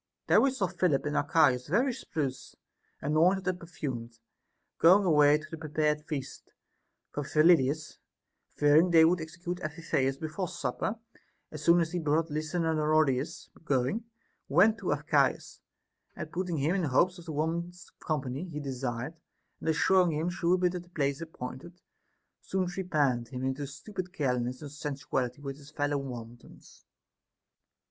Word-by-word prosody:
There - - +5
we 275 - +4
saw 255 -7 -1
Philip 175 -6 0
and 150 0 -2
Archias 145 -4 +3
very 240 - +2
spruce, 145 - -4 0.5
anointed 175 +6 +2
and 185 -1 0
perfumed, 130 -9 -6 0.6
going 190 +4 +6
away 150 -3 +5
to 155 - -10
the 165 - -6
prepared 150 0 -1
feast; 145 -4 -6 0.6
for 145 - -3
Phyllidas, 155 0 +3 0.6
fearing 150 +4 +5
they 165 -2 +7
would 170 +1 +2
execute 170 +2 -6
Amphi 155 +1 -6
theus 135 -3 0
before 160 +4 -3
supper, 145 - -3 0.5
as 155 -1 -7
soon 170 +2 +5
as 165 -1 -1
he 180 - -1
had 160 - -7
brought 155 +2 +1
Lysanoridas 155 -2 0
going, 140 - 0 0.4
went 200 +10 +4
to - - -2
Archias, - - +1 0.6
and - - -7
putting 180 -3 -2
him 150 +5 +1
in 195 -2 0
hopes 175 +7 +2
of 170 - -12
the 165 - -5
woman's 170 +3 -3
company 140 0 -3
he 150 -2 -5
desired, 130 0 -4 0.5
and - - -3
assuring 180 +2 +3
him 160 +4 -1
she 175 -1 -3
would 180 +1 +3
be - - +2
at 180 - -3
the 175 - -18
place 140 -3 -1
appointed, 160 +2 -8 0.6
soon 190 -1 -1
trepanned 150 -10 0
him 125 +1 -6
into 135 +2 -2
stupid 180 +6 -7
carelessness 125 -6 -1
and 145 - -7
sensuality 140 -3 -3
with 135 -1 -5
his 145 -1 -14
fellow 145 -1 -1
wantons. 120 -3 -10
155 Hz, 155 wpm, -29 LUFS, 140-175 Hz, 0.6 s, they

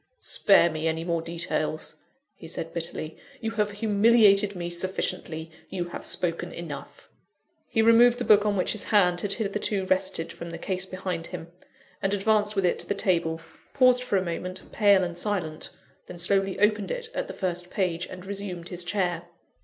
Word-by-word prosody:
"Spare 195 -4 +4
me 155 +1 -2
any 160 0 -1
more 170 -1 -1
details," 165 -2 -2 0.4
he 165 - -12
said, 165 0 -4
bitterly, 165 -1 -5 0.2
"you 225 -2 -3
have 210 -2 0
humiliated 205 -1 +4
me 175 -1 -4
sufficiently 170 -2 -3 0.2
you 175 -2 -3
have - - -6
spoken 175 0 -1
enough." 155 -5 -8 0.6
He 225 - +2
removed 235 +2 +6
the 245 - -3
book 210 -1 +6
on 205 -1 +1
which 180 - +1
his 215 - -3
hand 180 -4 +3
had 200 -1 0
hitherto 205 -2 -1
rested 185 -3 0
from 170 - -8
the 170 - -6
case 190 +2 -3
behind 185 -3 -4
him, 165 +1 -8 0.5
and 195 +1 +1
advanced 210 +1 +2
with 195 -2 +1
it 175 - +1
to - - -4
the 200 - 0
table 170 -4 0 0.3
paused 255 -2 +5
for 250 -5 0
a 185 - 0
moment, 185 +2 -5
pale 200 -3 +5
and 175 -1 -3
silent 175 -5 -3 0.4
then 180 - -9
slowly 195 +2 +1
opened 210 0 +2
it 485 -2 -3
at - - -2
the - - -7
first 180 -1 -3
page, 175 -3 -1
and 185 0 -10
resumed 190 -3 -6
his 180 -1 -2
chair. 175 -2 -1
185 Hz, 180 wpm, -26 LUFS, 170-205 Hz, 0.6 s, removed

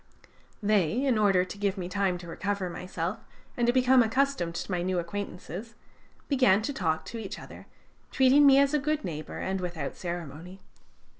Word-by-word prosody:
They, 210 - +2
in 260 -3 +3
order 195 -3 +4
to 185 - -9
give 200 -1 0
me 180 -2 -4
time 190 -1 0
to 175 0 -11
recover 185 +2 -3
myself 180 +3 -4 0.4
and 240 -1 +1
to - - +5
become 255 0 +5
accustomed 235 -7 0
to 190 - -4
my 180 -1 0
new 185 +1 -1
acquaintances, 190 +4 -5 0.5
began 250 -8 +4
to 285 - -2
talk 160 -9 -1
to 230 - -6
each 205 -3 -6
other, - - -12 0.4
treating 270 +2 +5
me 270 -1 +7
as 280 +1 +4
a 300 - +3
good 305 +2 -1
neighbor, 155 -3 -5
and 190 0 -2
without 170 -6 -4
ceremony. 175 +1 -6
195 Hz, 175 wpm, -28 LUFS, 175-250 Hz, 0.5 s, me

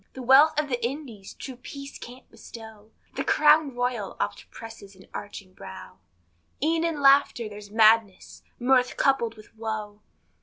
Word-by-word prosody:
The 260 - -8
wealth 290 +5 +6
of 300 - -1
the 245 -3 -3
Indies, 235 -6 -6
true 260 -3 -9
peace 275 +2 -10
can't 250 +2 -12
bestow, 220 -2 -13 0.2
The - - -3
Crown 300 -3 +4
Royal 245 -5 -3
oft - - -4
presses 225 -3 -12
an 190 - -17
aching 200 -2 -8
brow, 95 - -11 0.6
E'en 325 +2 +1
in 330 -3 -2
laughter 275 -4 +4
there's 205 -1 -11
madness 220 -2 +2 0.2
mirth 250 0 +2
coupled 235 -5 +1
with 215 +1 -17
woe. 215 -2 -5
235 Hz, 150 wpm, -25 LUFS, 210-275 Hz, 0.6 s, wealth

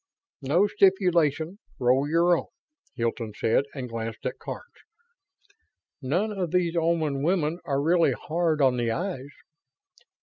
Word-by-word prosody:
"No 155 +9 +3
stipulation; 180 -4 +2 0.2
roll 130 +3 +2
your 170 +2 +4
own," - - -4 0.5
Hilton 115 -3 -3
said, 115 +5 +2
and 130 -3 -4
glanced 115 -1 -6
at - - -3
Karns. - - -7 1.4
"None 175 +11 0
of 190 -4 -2
these 175 0 +1
Oman 160 -4 +1
women 165 0 0
are 140 -1 0
really 165 +3 +3
hard 160 -2 0
on 130 -2 +3
the 120 -1 0
eyes." 140 - -3
155 Hz, 130 wpm, -26 LUFS, 130-175 Hz, 1.4 s, your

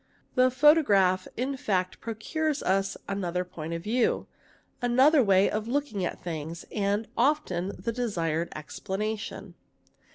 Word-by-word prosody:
The 255 0 +4
photograph 230 - +4
in 265 +3 -2
fa 190 -7 +1
procures 290 +7 -2
us 195 +1 +1
another 180 -2 -2
point 165 -2 -6
of 165 - -6
view, 235 +4 +1 0.6
another 260 +4 +5
way 195 -1 +4
of 215 +1 -2
looking 245 -7 -1
at 175 - -3
things, 165 0 -5
ar 205 +1 +1
often 200 - +1
the 230 - -3
desired 170 -9 -1
explanation. 205 +7 -5
205 Hz, 125 wpm, -28 LUFS, 180-250 Hz, 0.6 s, another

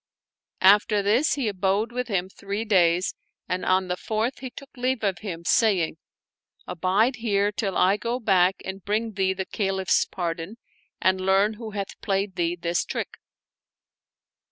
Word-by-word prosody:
After 205 +1 +5
this 230 +10 +3
he 270 -5 -1
abode 200 +3 0
with 250 0 -3
him 190 -5 -1
three 200 +3 -5
days 180 -4 +3 0.3
and 180 0 -2
on 185 0 +2
the 180 - -1
fourth 220 +6 -2
he 260 - -6
took 275 +3 -13
leave 255 -1 -1
of 195 -3 0
him, 170 -5 -6
saying, 185 -9 +2 0.4
" - - -37
Abide 190 +8 +1
here 205 -3 +1
till 200 -2 -2
I 190 +3 +4
go 235 +3 -2
back 190 -4 +3
and 190 0 -6
bring 220 +2 -1
thee 190 -2 0
the 190 0 -4
Caliph's 190 -2 +1
pardon 170 +4 -4 0.4
and 185 0 +2
learn 195 +3 +3
who 220 +1 -8
hath 200 -1 -5
played 195 -1 -1
thee 170 0 0
this 170 0 -1
trick." - - -5
195 Hz, 160 wpm, -25 LUFS, 185-220 Hz, 0.4 s, After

